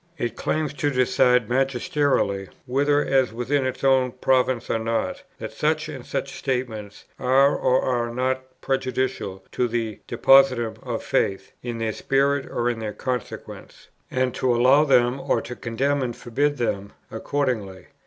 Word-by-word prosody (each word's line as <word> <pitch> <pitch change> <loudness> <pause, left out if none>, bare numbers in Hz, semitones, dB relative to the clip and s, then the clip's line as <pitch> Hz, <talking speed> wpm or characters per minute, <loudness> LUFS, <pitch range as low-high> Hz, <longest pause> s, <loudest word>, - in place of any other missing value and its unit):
It 120 -1 -3
claims 155 +1 -1
to 145 0 0
decide 125 -2 +3
magisterially, 135 - 0 0.2
whether 145 +3 +2
as 130 -3 +2
within 130 +4 0
its 130 +1 -5
own 130 -2 +3
province 130 -1 +1
or 115 - 0
not, 115 +1 -2 0.2
that - - -6
such - - 0
and - - -7
such - - -3
statements 115 -6 -4
are 135 +3 +4
or 130 - +2
are 120 -2 0
not 130 +1 -3
prejudicial 130 -7 -2
to 125 - 0
the 115 -2 -3
Depositum 120 -2 +4
of - - -4
faith, 95 - -1
in 120 -1 -4
their 115 -1 -2
spirit 140 +3 +1
or 120 0 -1
in 120 -2 -1
their 110 -1 -4
consequences, 125 +2 -6 0.2
and 130 -1 0
to 125 -2 +1
allow 130 +5 +5
them, 125 -1 +3
or - - 0
condemn 130 +4 -2
and 120 -2 -2
forbid 145 +5 -1
them, 100 -4 -2 0.2
accordingly. 110 -7 -2
125 Hz, 150 wpm, -24 LUFS, 115-135 Hz, 0.2 s, allow